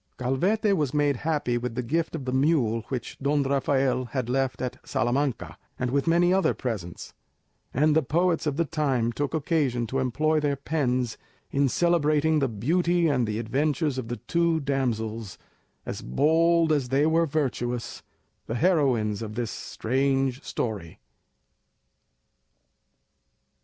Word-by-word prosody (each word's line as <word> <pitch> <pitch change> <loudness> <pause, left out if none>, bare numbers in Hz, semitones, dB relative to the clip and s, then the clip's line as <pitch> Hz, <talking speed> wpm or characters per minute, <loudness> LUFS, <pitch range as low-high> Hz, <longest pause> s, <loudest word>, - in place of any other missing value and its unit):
Calvete 190 - +1
was 150 -4 -1
made 145 -2 +2
happy 145 -5 -1
with 120 -1 -4
the 125 - -2
gift 165 +7 -1
of 140 -5 -5
the 130 - -2
mule 130 -5 +2
which 125 -4 -5
Don 140 +1 +1
Rafael 135 -1 +1
had 125 -1 -3
left 135 0 0
at 125 -1 -4
Salamanca, 125 +3 -1 0.2
and 125 -1 -2
with 140 +3 0
many 175 +2 +4
other 190 0 +2
presents; 100 -9 -5 0.6
and 150 +3 +2
the 160 - +5
poets 165 +3 +1
of 145 -1 -1
the 170 - +2
time 135 -6 0
took 145 +5 -2
occasion 140 -6 0
to 130 +4 -2
employ 155 +5 +1
their 145 -1 0
pens 130 -5 -1 0.3
in 140 0 +2
celebrating 155 -1 +2
the 135 - +1
beauty 170 - +1
and 125 -6 +1
the 105 0 -2
adventures 140 +4 0
of 120 - -5
the 120 +1 -4
two 170 -1 +1
damsels, 115 - -2 0.5
as - - -5
bold 160 - +3
as 140 -5 +1
they 140 +3 +3
were 165 +1 +3
virtuous, 125 -5 -2 0.5
the 115 - -3
heroines 125 - +2
of 110 -1 -6
this 120 -4 -2
strange 135 +2 -1
story. 100 - -4
135 Hz, 145 wpm, -26 LUFS, 120-155 Hz, 0.6 s, the